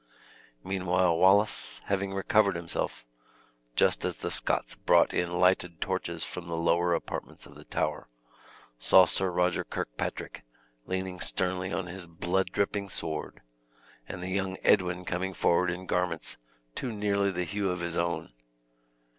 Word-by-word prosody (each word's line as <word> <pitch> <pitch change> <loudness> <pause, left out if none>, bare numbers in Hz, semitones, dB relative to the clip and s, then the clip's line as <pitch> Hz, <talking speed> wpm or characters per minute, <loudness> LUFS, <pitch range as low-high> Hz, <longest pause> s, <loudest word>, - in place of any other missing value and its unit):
Meanwhile 95 -2 +1
Wallace, 100 +3 +3
having 100 0 -1
recovered 100 0 +3
himself, 85 -7 -3 0.7
just - - +3
as - - -2
the - - -4
Scots - - -1
brought - - +3
in 90 -1 0
lighted 90 -1 +2
torches - - -2
from 90 -1 -6
the 85 -1 -3
lower 85 +1 +2
apartments - - -5
of - - -14
the - - -14
tower, - - -2 0.7
saw 90 +9 +7
Sir 95 +1 +1
Roger 90 0 +1
Kirkpatrick - - -4 0.5
leaning 95 -1 -3
sternly 95 0 -1
on 95 - -2
his 90 0 -7
blood 85 +3 -1
dripping 100 0 -1
sword, 80 -3 -4 0.7
and 90 -1 -6
the 90 - -3
young 95 0 -1
Edwin 90 -2 +3
coming 95 +1 -2
forward 90 +1 +3
in 90 +2 -4
garments 90 -3 -1 0.4
too 125 - -3
nearly 100 -2 +1
the 90 -1 -1
hue 100 +2 -1
of 90 -1 -2
his 85 -1 -2
own. 85 0 -1
90 Hz, 145 wpm, -29 LUFS, 85-95 Hz, 0.7 s, saw